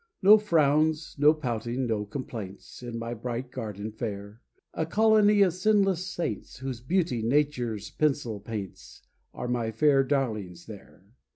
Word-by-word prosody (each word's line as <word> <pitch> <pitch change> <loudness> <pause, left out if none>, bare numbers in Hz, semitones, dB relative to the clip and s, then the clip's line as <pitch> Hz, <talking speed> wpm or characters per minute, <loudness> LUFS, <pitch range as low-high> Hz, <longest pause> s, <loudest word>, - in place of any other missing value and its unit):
No 210 +3 +8
frowns, 155 -4 +2
no 150 +1 +7
pouting, 125 -4 -3
no 110 -3 -1
complaints, 110 -6 -7
In 120 -1 -6
my 115 +1 -4
bright 120 +2 -5
garden 110 -4 -5
fair, 105 -1 -6 0.3
A - - -1
colony 210 +3 +4
of 185 -4 +2
sinless 195 -2 +2
saints, 170 - -4
Whose 130 -2 -5
beauty 160 -4 0
Nature's 120 -4 0
pencil 135 -8 0
paints, 105 -2 -8 0.3
Are 125 - -6
my 120 -2 -1
fair 135 +4 +3
darlings 110 -11 -2
there. 100 -3 -13
125 Hz, 135 wpm, -27 LUFS, 110-155 Hz, 0.3 s, No